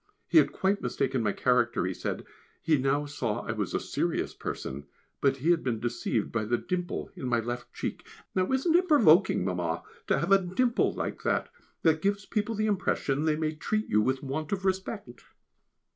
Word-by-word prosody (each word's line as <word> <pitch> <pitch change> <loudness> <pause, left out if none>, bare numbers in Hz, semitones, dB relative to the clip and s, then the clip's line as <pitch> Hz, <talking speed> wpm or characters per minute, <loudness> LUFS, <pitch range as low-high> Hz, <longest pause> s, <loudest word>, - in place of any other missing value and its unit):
He - - +6
had - - +3
quite 195 +2 0
mistaken 130 -2 -1
my 105 -2 +1
character 120 -5 +2
he 95 - -1
said, - - -4 0.3
he 160 - +2
now 140 +2 +1
saw 120 -6 -2
I - - -2
was 105 -4 -2
a - - +2
serious - - -2
person, 70 +2 -5 0.3
but 135 -1 +3
he 155 +6 +2
had 170 -2 +2
been 120 -4 -1
deceived 120 -1 -1
by 110 -2 -1
the 120 +3 +1
dimple 180 +6 -3
in 130 - -5
my 120 -1 +2
left 120 +2 -5
cheek. - - -5 0.3
(Now 185 +3 +1
isn't 270 +6 +2
it 365 +1 +4
provoking, 195 - +5
Mamma, 90 -3 -1 0.2
to - - +3
have 170 - -1
a 195 0 +7
dimple 235 +7 +1
like - - -4
that, - - 0 0.3
that 160 -1 +3
gives 200 0 0
people 220 +1 -1
the 215 +1 0
impression 160 -8 0
they 155 -1 +3
may 155 0 -1
treat 215 +7 -2
you 105 - +4
with 130 +5 0
want 145 +3 -3
of 195 -1 -2
respect?) 190 - -3
150 Hz, 195 wpm, -28 LUFS, 120-195 Hz, 0.3 s, a